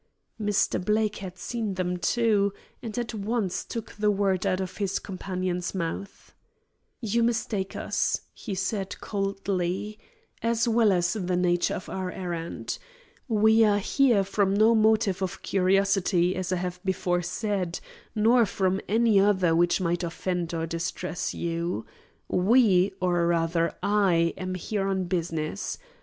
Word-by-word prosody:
Mr. 205 -3 +1
Blake 215 +1 +1
had 185 -2 -8
seen 220 -1 -3
them, 180 -1 -1
too, 205 +1 +2 0.3
and 225 0 -6
at 240 -1 -2
once 210 -2 -2
took 230 -2 -6
the 210 0 +1
word 195 -2 +1
out 185 - +1
of 185 -1 -5
his 195 -2 -1
companion's 185 -1 -3
mouth. 185 +3 -5 0.7
"You 230 +1 +1
mistake 225 -4 -1
us," - - 0
he 205 -5 -6
said 195 +1 -3
coldly, 195 0 -2 0.4
"as 230 +1 +1
well 225 -2 +4
as 175 -2 +2
the 185 -4 -1
nature 175 -1 +1
of 185 - -7
our 185 -1 -3
errand. 170 -3 -4 0.5
We 220 -1 +4
are 205 -2 +4
here 230 0 +3
from 195 0 +1
no 220 +3 +5
motive 215 -3 +3
of 190 -2 -4
curiosity, 190 -1 +2
as 185 0 -3
I - - +2
have 180 0 -3
before 180 -2 0
said, 180 -1 -2 0.4
nor 225 +2 +4
from 190 0 0
any 220 -1 +4
other 190 -4 +3
which 175 +1 +3
might 175 0 0
offend 175 0 -2
or 165 -1 -2
distress 170 +2 -3
you. 170 -7 -2 0.4
We 195 -2 +4
or 175 -2 +1
rather 165 0 +1
I 185 -5 +3
am 185 0 -4
here 195 +2 -2
on 190 -1 0
business. 170 0 -2
190 Hz, 145 wpm, -27 LUFS, 180-210 Hz, 0.7 s, no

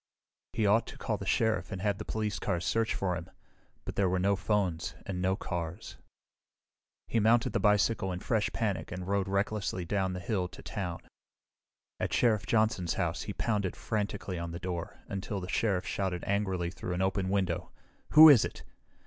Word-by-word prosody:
He 110 - +1
ought 110 +3 +3
to - - -9
call - - -2
the - - -7
Sheriff 110 -2 +1
and 95 - -4
have 100 -1 0
the - - -5
police 105 -4 -2
cars 90 -3 -1
search 110 +6 +1
for 90 -2 0
him, 85 -1 -7 0.6
but - - -5
there 95 -2 +2
were 95 - +1
no 100 +2 +2
phones 95 -4 -1
and 90 -2 -3
no 95 +1 +2
cars. 85 -4 -5 1.1
He 115 - +1
mounted 115 +2 +3
the - - +2
bicycle 105 -1 +2
in 90 - -3
fresh 110 +1 0
panic 105 -4 -2
and 90 0 -5
rode 100 -1 +1
recklessly 100 -2 -1
down 95 0 0
the 90 - -4
hill 90 0 -1
to - - -13
town. 90 -6 -4 1.0
At - - -2
Sheriff 110 -8 +2
Johnson's 110 -7 +1
house - - -1
he - - -5
pounded 105 -5 -1
frantically 100 -4 -3
on 85 0 -4
the 85 - -5
door 90 -2 -5
until 100 0 -4
the 90 - -6
Sheriff 95 -2 0
shouted 95 -3 -2
angrily 95 -4 0
through 90 +1 -4
an 95 - 0
open 95 0 0
window, 95 -4 0 0.4
"Who 155 +1 +11
is 140 -8 +8
it?" - - -6
95 Hz, 185 wpm, -30 LUFS, 90-105 Hz, 1.1 s, Who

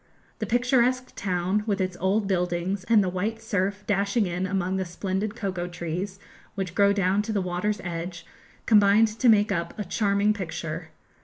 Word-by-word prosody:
The - - -2
picturesque 250 +1 +2
town, 185 +2 0
with 205 -2 0
its 185 -1 -1
old 195 +3 +1
buildings, 180 +1 -1
and 225 -3 +5
the - - -1
white 205 +5 -2
surf 200 -2 -1
dashing 200 +2 +1
in 180 +1 -2
among 190 -1 -1
the 190 - 0
splendid 190 +4 -3
cocoa 185 -5 -3
trees 175 +3 -4 0.4
which 190 -3 -3
grow 200 +1 +4
down 200 0 +2
to 215 +2 -4
the 210 - +1
water's 185 +3 -1
edge, 175 0 -5 0.4
combined 210 +1 +5
to 225 +3 +2
make 210 -1 +4
up 170 -2 -2
a 210 - -2
charming 200 +2 +2
picture. 165 -4 -5
195 Hz, 170 wpm, -26 LUFS, 180-210 Hz, 0.4 s, and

